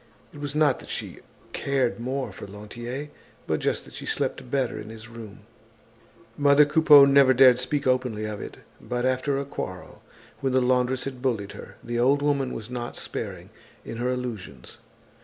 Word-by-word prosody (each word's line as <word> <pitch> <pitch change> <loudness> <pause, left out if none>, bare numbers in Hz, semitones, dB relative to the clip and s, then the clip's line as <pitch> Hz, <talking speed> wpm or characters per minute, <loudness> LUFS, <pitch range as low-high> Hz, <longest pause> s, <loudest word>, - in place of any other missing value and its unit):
It 145 - -11
was 145 0 -5
not 150 -4 +3
that - - -12
she - - -5 0.3
cared 135 -4 0
more 130 -1 -3
for 95 - -9
Lantier, 120 +8 -7 0.4
but - - -1
just - - -1
that - - -14
she - - -8
slept - - -2
better 130 -2 -1
in 105 - -8
his 110 0 -10
room. 115 -3 -11 0.9
Mother 145 +1 +5
Coupeau 145 -1 +7
never 140 -1 +5
dared 125 -1 +7
speak 140 +3 -1
openly 125 -4 0
of 105 -1 -5
it. - - -8 0.2
But 120 0 -2
after 130 +2 +1
a 140 - -2
quarrel, 95 -9 -7 0.4
when 135 -1 -1
the 130 - +4
laundress 125 0 +1
had 130 -2 -6
bullied 115 -7 -1
her, - - -11
the 120 0 -3
old 140 +4 +3
woman 140 -3 +1
was 110 - -6
not 120 -1 -5
sparing - - -6 0.3
in 115 - -6
her 125 +2 -1
allusions. 110 - -6
125 Hz, 175 wpm, -25 LUFS, 120-140 Hz, 0.9 s, Coupeau